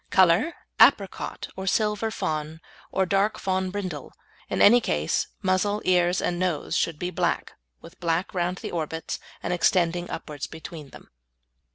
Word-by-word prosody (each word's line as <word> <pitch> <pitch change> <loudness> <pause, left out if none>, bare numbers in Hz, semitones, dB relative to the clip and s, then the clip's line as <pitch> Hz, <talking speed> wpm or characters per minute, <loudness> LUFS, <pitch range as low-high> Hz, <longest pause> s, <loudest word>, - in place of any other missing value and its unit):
Colour, 190 - +4 0.2
apricot - - +3
or 190 0 -5
silver 210 +2 +1
fawn, 160 -7 -3 0.3
or 190 - +1
dark 200 +3 +1
fawn 190 -1 -1
brindle. 185 -7 -5 0.4
In - - -1
any 240 +4 +7
case, 75 - 0 0.2
muzzle, 190 +2 +1
ears, 180 0 +3
and 175 0 -1
nose 180 -5 -1
should 165 -3 0
be 180 +3 -3
black, - - -1 0.3
with - - -14
black 170 +1 -1
round 180 0 -1
the - - -6
orbits, 160 -1 -3 0.2
and 175 - -1
extending 175 0 +2
upwards 150 -3 -5
between 160 -2 -9
them. - - -15
180 Hz, 150 wpm, -25 LUFS, 165-190 Hz, 0.4 s, any